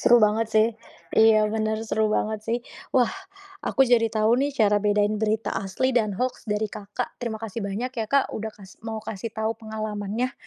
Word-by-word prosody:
Seru 240 - +6
banget 215 +2 +3
sih, 220 0 +5 0.5
iya, 220 -1 +6
bener, 220 0 0
seru 220 0 +1
banget 215 0 0
sih. 230 +1 +1 0.4
Wah, 250 -2 +4 0.5
aku 270 - +3
jadi 235 -2 +4
tahu 220 +1 +3
nih 285 +1 +1
cara 210 -4 +4
bedain 205 0 +2
berita 220 0 0
asli 195 +7 0
dan 215 -3 +2
hoaks 255 +3 -2
dari 210 0 0
Kakak. 210 +4 -5
Terima 235 -3 -3
kasih 225 0 -5
banyak 210 +6 -3
ya, 225 -2 -2
Kak, 280 -1 +2
udah 220 0 -4
kasih 195 -2 -15
mau 225 -1 -3
kasih 215 +1 -5
tahu 220 0 -1
pengalamannya. 215 +1 -3
220 Hz, 185 wpm, -25 LUFS, 210-230 Hz, 0.5 s, Seru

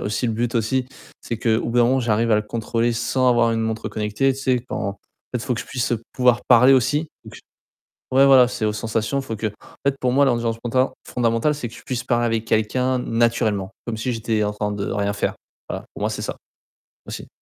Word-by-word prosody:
aussi 105 +4 -1
le 115 - 0
but 115 +1 -1
aussi, 120 +3 0 0.4
c'est 115 - -5
qu'au 115 -1 +2
bout 120 +1 0
d'un 120 - +6
moment 130 +2 +2
j'arrive 115 -1 +1
à - - +6
le 105 - +2
contrôler 115 +2 -1
sans 125 +2 +1
avoir 120 -1 +3
une 115 - 0
montre 110 0 -2
connectée, 105 +5 0
tu 135 - -7
sais 130 -2 +1
quand - - -3
en 100 - -6 0.3
fait 125 - -1
faut 130 - 0
que 115 - -4
je - - -8
puisse 125 -1 -2 0.2
pouvoir 125 -2 +3
parler 125 +2 +7
aussi 135 +5 +2 0.2
donc - - -11 0.7
Ouais 135 +1 +6
voilà, 130 -2 +7
c'est 120 -2 -4
aux 105 - +1
sensations, 115 +5 -1
faut 135 -4 -5
que 110 0 -2
en - - -7 0.3
fait 140 0 +2
pour 125 -1 +1
moi 140 +2 +5
l'ambiance 120 -3 +1
mentale 130 +2 +1
fondamentale 115 +4 +1
c'est 145 -5 -5
que 115 - -14
je - - -12
puisse 125 -2 -4
parler 120 -1 +1
avec 115 -1 -1
quelqu'un 125 +4 +1
naturellement 115 -5 0 0.2
comme 115 -2 -3
si 125 +3 -2
j'étais 110 -2 0
en 105 - -1
train 105 0 -2
de 100 -1 -3
rien 100 0 -1
faire. 100 - -1 0.3
Voilà, - - -5
pour - - -10
moi - - +1
c'est - - -4
ça, - - -4 0.7
aussi. - - -7
115 Hz, 230 wpm, -22 LUFS, 110-125 Hz, 0.7 s, parler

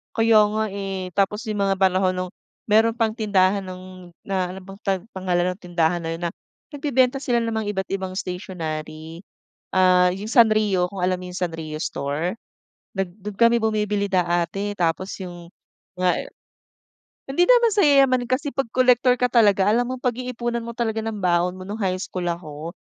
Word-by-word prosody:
Kaya 225 -1 +4
nga, 215 +1 -1
eh, 195 -2 -4
tapos 200 +4 0
yung 215 -2 -3
mga 195 - +2
panahon 185 -1 +2
nung 185 0 -4 0.4
meron 225 +1 +4
pang 225 -2 +1
tindahan 200 -3 +2
ng 185 -1 -11
na 190 -2 -1
ano 185 +1 -7
bang 195 +1 -12
pang 190 -3 -1
pangalan 180 -1 0
ng 185 - -20
tindahan 175 -1 0
na 165 - -4
'yon 170 - -9
na 170 - 0 0.4
nagbebenta 270 -2 +1
sila 245 -3 +1
namang 220 -2 -2
iba't 190 -2 -1
ibang 190 -1 -3
stationary. 160 -4 -5 0.5
Ah, 180 -1 +4
yung 195 +3 -6
Sanrio, 215 -6 +3
kung 200 - -8
alam 180 +1 +2
mo - - -7
yung 180 - -6
Sanrio 165 -3 -4
store? 150 +6 -2 0.6
Nag 195 -2 -1
do'n 210 +1 -6
kami 235 +2 +4
bumibili 210 -2 0
dati 180 +2 0
tapos 175 +3 0
yung 175 -2 -8 0.5
nga, 180 0 +2
eh - - -5 1.0
hindi 280 +6 +3
naman 480 +2 +5
sa 405 -2 +3
yayamanin 270 -4 +4
kasi 275 +3 0
pag 270 -4 -2
collector 250 0 +4
ka 250 - +3
talaga 205 -4 +4
alam 235 +3 +3
mong 255 0 -5
pag-iipunan 240 -1 -2
mo 235 - -6
talaga 225 -2 -2
ng 220 -2 -4
baon 180 0 +1
mo, 185 - -9
no'ng 205 +3 -5
high 185 -2 -1
school 185 -2 -4
ako. 165 -1 -5
195 Hz, 175 wpm, -23 LUFS, 180-225 Hz, 1.0 s, naman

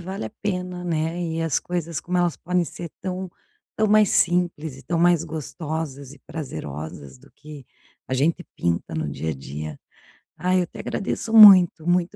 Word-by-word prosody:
vale 190 - -5
a 110 - -6
pena, 180 -3 -3
né, 165 0 -2
e 165 -1 -2
as 165 -4 0
coisas, 170 -3 -3
como 180 +3 -2
elas 175 -2 +1
podem 180 0 0
ser 170 0 -8
tão 185 0 -4 0.4
tão 215 - +1
mais 210 -1 +4
simples, 170 -5 +1
e 135 - -13
tão 170 +1 -2
mais 175 -1 +4
gostosas 155 -3 -5
e 145 - -15
prazerosas 75 - -7
do - - -20
que 150 -3 -12 0.4
a - - -7
gente 160 +7 +1
pinta 85 -1 -2
no - - -2
dia 80 - -3
a - - -3
dia. 75 +2 -7 0.6
Aí, 185 +1 +2
eu 175 - 0
te - - -14
agradeço 220 +3 -3
muito. 185 -6 +8
Muito 175 0 +1
170 Hz, 180 wpm, -23 LUFS, 140-180 Hz, 0.6 s, muito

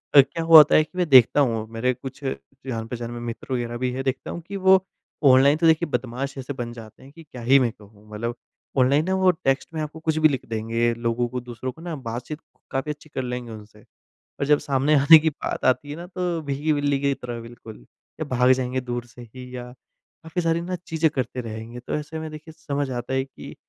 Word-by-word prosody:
अ, 140 - +12
क्या 140 +5 -4
हुआ 165 -1 +10
था - - +6
कि 155 +4 -8
मैं 180 -1 +1
देखता 130 0 +7
हूँ 115 -5 +1
मेरे 125 +3 +1
कुछ 130 +2 -10
जान-पहचान 120 -3 -5
में 120 - -6
मित्र 120 +2 -6
वगैरह 120 -1 -2
भी 125 - +1
हैं 130 +2 -4
देखता 130 -1 -3
हूँ 170 - -6
कि 200 - -6
वो 190 0 +6 0.4
ऑनलाइन 135 +2 +6
तो 165 +1 +3
देखिए 160 +1 +3
बदमाश 135 +1 -3
ऐसे 135 +1 -5
बन 120 -3 -5
जाते 110 -2 -12
हैं 135 - -14
कि 165 +3 -14
क्या 130 -5 -11
ही 130 +4 +5
मैं 125 -3 +1
कहूँ, 105 0 -19
मतलब 115 +3 -4 0.4
ऑनलाइन 140 +4 +4
ना 190 - 0
वो 185 -1 +4
टेक्स्ट 135 -2 -1
में 160 - -3
आपको 150 +1 -6
कुछ 160 0 -1
भी 155 0 +6
लिख 135 -5 -3
देंगे, 115 +1 0
लोगों 115 +1 -1
को 125 +1 -4
दूसरों 125 +1 -6
को 160 - -16
ना 170 -1 -5
बातचीत 125 +3 -6 0.3
काफ़ी 135 +2 -2
अच्छी 150 +1 -11
कर 135 - -3
लेंगे 125 -1 -5
उनसे, 105 -1 -12
और - - -28 0.4
जब 150 0 +5
सामने 140 +2 +1
आने 145 +4 +9
की 160 +1 +1
बात 145 - -5
आती 130 +3 +2
है 145 - -5
ना, 170 +1 -8
तो 180 -2 -2
भीगी 145 +2 -1
बिल्ली 145 -1 0
की 140 0 +1
तरह 120 -2 -7
बिल्कुल 115 -1 -11 0.4
या - - 0
भाग 125 +1 +5
जाएँगे 130 0 -1
दूर 120 -1 -4
से 120 +1 -13
ही, 125 +2 -10
या 125 0 -7
काफ़ी 160 +6 -8
सारी 165 0 +1
ना 180 +2 -3
चीज़ें 160 -1 +1
करते 130 -1 -2
रहेंगे। 115 +1 -7
तो 125 - -5
ऐसे 150 +2 -4
में 160 0 -6
देखिए 155 +1 -10
समझ 145 -2 -3
आता 120 0 -4
है 130 0 +1
कि 135 - -11
130 Hz, 230 wpm, -24 LUFS, 120-155 Hz, 0.4 s, अ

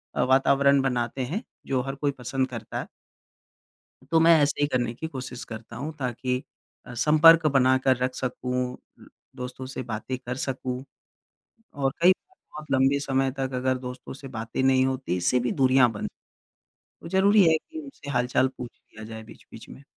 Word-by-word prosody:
अ, - - +1
वातावरण 140 +1 +4
बनाते 125 -1 -1
हैं 185 - -4 0.2
जो 130 -2 +1
हर 135 +2 -5
कोई 140 +1 0
पसंद 130 +2 -1
करता 115 -3 -6
है। - - -6 1.2
तो 165 - +5
मैं 165 0 +7
ऐसे 145 0 +1
ही 145 - +3
करने 120 -4 -1
की 160 +7 -5
कोशिश 130 -4 -7
करता 115 +1 -9
हूँ 145 +6 -5
ताकि 125 0 -2 0.4
अ, 125 - -9
संपर्क 155 +5 +6
बनाकर 130 -1 +3
रख 125 +1 -1
सकूँ, 125 0 -3 0.6
दोस्तों 125 0 -6
से 130 0 -6
बातें 120 +2 -4
कर 125 -1 -6
सकूँ। 130 -1 -3 0.9
और 135 -1 -1
कई 180 - +8
बार 375 - -15 0.2
बहुत 155 -1 -10
लंबे 135 +1 +3
समय 135 -1 0
तक 135 0 -2
अगर 130 0 0
दोस्तों 125 0 -8
से 135 0 -10
बातें 115 +3 -3
नहीं 130 0 +4
होती, 130 -8 -2
इससे 110 +8 +2
भी 120 - -1
दूरियाँ 130 -2 +4
बन 105 - -4 1.0
तो - - -9
ज़रूरी 195 +3 +5
है 160 - +4
कि 320 - -10
उनसे 275 - -10
हाल-चाल 125 0 +2
पूछ 120 -1 -7
लिया 110 - -13
जाए 110 0 -8
बीच-बीच - - -14
में। 140 - -12
130 Hz, 175 wpm, -26 LUFS, 125-140 Hz, 1.2 s, कई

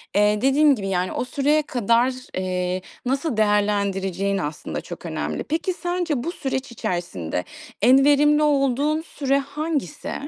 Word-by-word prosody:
eee, 210 +1 +3
dediğim 280 +2 +4
gibi, 200 -4 -5
yani, 185 -1 0
o - - -2
süreye 290 +3 +2
kadar, 240 -1 +1 0.2
eee, 185 0 -1 0.2
nasıl 270 0 -1
değerlendireceğin 200 -2 +1
aslında 150 -4 -4
çok - - -9
önemli. - - -3
Peki, 330 +4 -1
sence 350 -7 -2
bu 340 - -2
süreç 265 -5 -4
içerisinde 175 - -3 0.4
en 260 +5 +6
verimli 295 +1 +4
olduğun 290 +1 +2
süre 275 -4 -1
hangisi? 295 +1 -3
260 Hz, 135 wpm, -23 LUFS, 200-295 Hz, 0.4 s, en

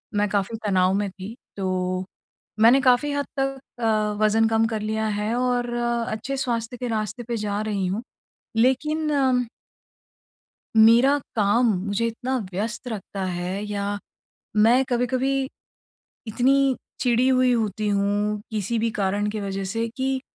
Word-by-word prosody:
मैं 205 0 +2
काफ़ी 205 +2 -1
तनाव 185 -2 +3
में 205 0 0
थी। 195 +4 -9 0.2
तो 185 -1 -1 0.6
मैंने 240 +5 +7
काफ़ी 260 +3 +3
हद 285 0 -1
तक 270 0 0 0.2
अ, - - 0 0.4
वज़न 220 +1 +4
कम 225 0 +3
कर 220 -1 -3
लिया 220 +1 -1
है 210 +2 -1
और 245 -1 0
अच्छे 235 +2 -2
स्वास्थ्य 240 -2 -2
के 245 - -4
रास्ते 215 +1 -3
पे 235 0 -3
जा 210 -1 -2
रही 205 -3 -1
हूँ। 200 +6 -2 0.5
लेकिन 300 +6 +2
अम 260 -3 +2 1.3
मेरा 235 +6 +6 0.2
काम 215 +3 +3 0.2
मुझे 205 +3 0
इतना 245 +3 -2 0.2
व्यस्त 225 +7 -3
रखता 200 -3 -5
है 180 +2 -3
या 205 -1 -3 0.8
मैं 245 +4 +5
कभी-कभी 260 +2 0 0.8
इतनी 265 +4 +2 0.2
चिड़ी 245 0 +3
हुई 255 -1 +4
होती 215 -2 -1
हूँ 205 +1 0
किसी 220 +1 -1
भी 230 +1 +1
कारण 205 +1 0
के 215 0 -4
वज़ह 195 -1 -3
से 230 +2 -1
कि 265 0 -1
225 Hz, 145 wpm, -24 LUFS, 205-250 Hz, 1.3 s, मैंने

